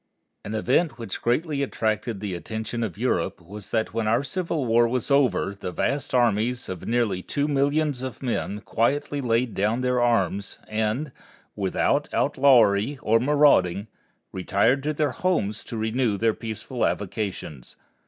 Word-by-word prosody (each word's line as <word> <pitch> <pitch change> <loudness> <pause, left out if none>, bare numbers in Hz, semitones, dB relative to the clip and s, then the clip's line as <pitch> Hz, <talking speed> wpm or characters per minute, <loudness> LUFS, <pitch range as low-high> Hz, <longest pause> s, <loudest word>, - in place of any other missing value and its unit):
An 105 - -5
event 130 +5 +1
which 115 -5 -6
greatly 140 +4 0
attracted 110 -4 -1
the 100 -3 -3
attention 110 +6 -4
of 105 -7 -3
Europe - - -1
was 100 +4 -10
that 110 -2 -1
when 115 -1 -1
our 115 +5 +2
Civil 165 -2 -2
War 120 0 +4
was 125 +3 -2
over 135 -7 +2
the 100 -2 -6
vast 140 +7 -1
armies 120 +1 +1
of 95 -2 -6
near 120 +1 +2 0.2
two 145 +9 -2
millions 145 -1 +1
of 130 +1 -6
men 105 -4 -2
quietly 140 +6 0
laid 120 -2 +1
down 110 +5 0
their 125 -1 +1
arms 100 -5 0
and, 110 +7 -1 0.4
without 95 -3 0
outlawry 125 -2 +4
or 115 +1 +4
marauding, 125 -9 +3 0.5
retired 100 +8 +1
to 150 +2 -1
their 150 -2 0
homes 120 - -1
to 115 - -6
renew 110 0 0
their 115 +1 +2
peaceful 115 +3 -5
avocations. 95 - -3
115 Hz, 150 wpm, -25 LUFS, 105-135 Hz, 0.5 s, War